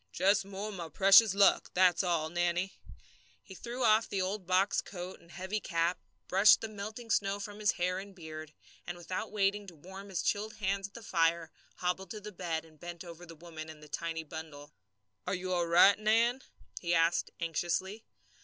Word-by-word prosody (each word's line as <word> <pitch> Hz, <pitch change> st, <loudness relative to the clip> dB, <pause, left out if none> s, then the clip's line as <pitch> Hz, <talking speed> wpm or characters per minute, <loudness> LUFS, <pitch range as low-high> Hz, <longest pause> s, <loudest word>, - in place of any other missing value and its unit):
"Just 195 Hz, -, +2 dB
more 200 Hz, +2 st, -5 dB
of -, -, -7 dB
my 170 Hz, -4 st, -6 dB
precious 195 Hz, +5 st, +6 dB
luck, 200 Hz, -1 st, +4 dB
that's 180 Hz, -1 st, +4 dB
all, 170 Hz, -4 st, 0 dB
Nannie." 175 Hz, +2 st, 0 dB, 0.7 s
He 190 Hz, -, -12 dB
threw 240 Hz, +6 st, -5 dB
off 220 Hz, 0 st, +4 dB
the 195 Hz, -, -2 dB
old 190 Hz, 0 st, -2 dB
box 190 Hz, +2 st, +2 dB
coat 185 Hz, -1 st, -8 dB
and 170 Hz, -, -21 dB
heavy 190 Hz, +4 st, -4 dB
cap, 170 Hz, -2 st, 0 dB, 0.3 s
brushed 195 Hz, +3 st, +6 dB
the 225 Hz, -, -3 dB
melting 215 Hz, +2 st, -7 dB
snow 195 Hz, -1 st, +1 dB
from 205 Hz, +1 st, -7 dB
his 210 Hz, -1 st, +2 dB
hair 180 Hz, 0 st, -1 dB
and 195 Hz, 0 st, -10 dB
beard, 155 Hz, -3 st, -8 dB, 0.4 s
and 175 Hz, 0 st, -5 dB
without 185 Hz, +5 st, -5 dB
waiting 205 Hz, 0 st, 0 dB
to 175 Hz, -, -11 dB
warm 190 Hz, +6 st, -11 dB
his 185 Hz, -3 st, -2 dB
chilled 215 Hz, +1 st, -1 dB
hands 195 Hz, -1 st, -1 dB
at 200 Hz, -, -28 dB
the 235 Hz, -, -9 dB
fire, 165 Hz, -3 st, +1 dB, 0.2 s
hobbled 180 Hz, +1 st, -2 dB
to 215 Hz, -, -6 dB
the 210 Hz, +1 st, -8 dB
bed 170 Hz, -4 st, -3 dB
and 155 Hz, -2 st, -20 dB
bent 175 Hz, 0 st, -8 dB
over 170 Hz, +1 st, -11 dB
the 165 Hz, -, -11 dB
woman 160 Hz, -1 st, -9 dB
and 155 Hz, -1 st, -12 dB
the -, -, -12 dB
tiny 165 Hz, +1 st, -4 dB
bundle. 155 Hz, -1 st, -9 dB, 0.5 s
"Are 185 Hz, -, 0 dB
you 185 Hz, 0 st, -3 dB
all 175 Hz, -1 st, +1 dB
right, 180 Hz, +5 st, +6 dB
Nan?" 230 Hz, +4 st, +2 dB, 0.4 s
he 175 Hz, -1 st, 0 dB
asked 165 Hz, +1 st, +2 dB
anxiously. 175 Hz, +6 st, -2 dB
185 Hz, 195 wpm, -31 LUFS, 170-200 Hz, 0.7 s, precious